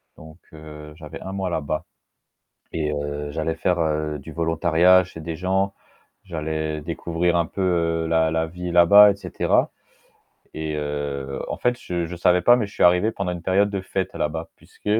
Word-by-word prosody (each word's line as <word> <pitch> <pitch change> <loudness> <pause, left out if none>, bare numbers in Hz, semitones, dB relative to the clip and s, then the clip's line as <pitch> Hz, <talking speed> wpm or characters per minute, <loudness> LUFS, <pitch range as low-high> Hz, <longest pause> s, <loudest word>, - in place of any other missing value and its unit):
Donc, 80 +1 -14 0.2
heu, 75 -1 -11
j'avais - - -10
1 95 - -6
mois 95 -1 -2
là-bas 75 -2 -2 0.9
et 75 -2 -2
heu, 75 0 -4
j'allais 80 +2 -2
faire 75 -3 0
du 75 +4 -10
volontariat 85 +3 +3
chez 85 -2 -11
des 80 0 -5
gens. 95 +2 0 0.5
J'allais 80 -3 -3
découvrir 85 +2 -1
un 85 - +2
peu 85 -4 0
la 80 -1 +2
la 80 0 0
vie 90 +1 -6
là-bas, 100 +4 +8
et - - -10
cetera. 100 - 0 0.9
Et 80 0 -3
heu, 70 -2 -4
en - - -4
fait 125 0 0
je 85 -5 -3
je 85 +2 -7
savais 90 +1 +3
pas, 120 +7 +6
mais 120 -3 0
je 100 - -15
suis - - 0
arrivé 90 +5 +4
pendant 100 -4 -3
une 90 -1 -6
période 100 +3 +2
de 100 -2 -2
fête 95 0 -3
là-bas. 80 +2 -3
Puisque, - - -24
85 Hz, 175 wpm, -23 LUFS, 75-90 Hz, 0.9 s, là-bas